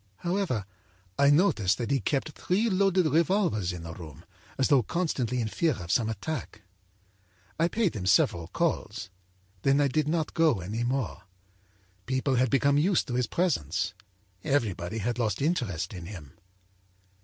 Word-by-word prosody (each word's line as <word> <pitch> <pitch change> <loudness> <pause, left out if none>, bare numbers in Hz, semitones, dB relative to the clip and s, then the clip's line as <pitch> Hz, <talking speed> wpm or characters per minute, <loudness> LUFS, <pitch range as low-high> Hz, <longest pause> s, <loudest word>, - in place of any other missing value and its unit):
âHowever, 175 - -1 0.5
I 140 0 +6
noticed 130 - +3
that 120 +2 -3
he 140 - +3
kept 140 +7 -1
three 205 +9 0
loaded 190 -1 +3
revolvers 160 - +2
in 90 -2 -7
the 85 0 -7
room, 80 -6 -11 0.3
as 130 - +2
though 140 -3 +5
constantly 125 - -1
in 115 - 0
fear 160 +8 +1
of 90 -6 -6
some 110 -2 +2
attack. 110 -1 -5 1.0
âI 165 +1 +3
paid 210 - 0
him 95 -3 -3
several 85 -4 +3
calls. 110 - -2 0.5
Then 135 +4 +3
I 145 - +4
did 150 +3 0
not 160 0 -1
go 160 - +3
any 105 +7 -3
more. 125 -3 -2 0.9
People 130 +1 0
had 125 0 +3
become 140 +2 +3
used 180 +3 +2
to - - -2
his 125 -2 +1
presence; 100 - 0 0.5
everybody 110 -7 -1
had 120 +3 -2
lost 110 -3 0
interest 120 - -1
in 90 -3 -7
him. 85 -9 -9
125 Hz, 155 wpm, -28 LUFS, 100-160 Hz, 1.0 s, I